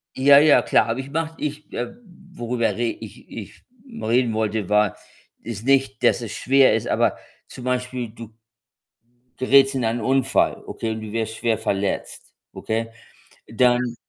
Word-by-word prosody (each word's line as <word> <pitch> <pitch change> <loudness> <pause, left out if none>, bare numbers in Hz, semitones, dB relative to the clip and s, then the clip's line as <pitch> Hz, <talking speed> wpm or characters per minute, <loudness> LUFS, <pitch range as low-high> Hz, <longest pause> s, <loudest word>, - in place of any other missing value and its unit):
Ja, 140 +1 +6
ja 150 0 +6
klar, - - +3
habe 115 +3 -2
ich 135 - -10
gemacht. 160 +2 -3
Ich, 150 0 -5
äh, 120 - -4 0.4
worüber 120 -3 -1
re 120 - -2 0.2
ich - - -12
ich - - -10 0.2
reden 125 - 0
wollte, 110 -2 -2
war, 105 -1 +2 0.5
ist 115 0 -7
nicht, 135 -6 +1
dass - - +3
es 110 -3 -6
schwer 135 +1 +4
ist, - - -2
aber - - +1 0.3
zum 125 - -11
Beispiel, 125 -2 -2
du 115 -1 -12 1.0
gerätst 135 +1 +4
in 130 -3 -1
einen 115 +1 -1
Unfall, 135 +3 +1
okay, 115 - -4
und 110 0 -5
du 110 -1 -7
wirst 110 0 -3
schwer 115 -2 0
verletzt, 100 -3 -3 0.2
okay. 115 +1 -3 0.6
Dann 120 0 +1
120 Hz, 160 wpm, -22 LUFS, 110-135 Hz, 1.0 s, Ja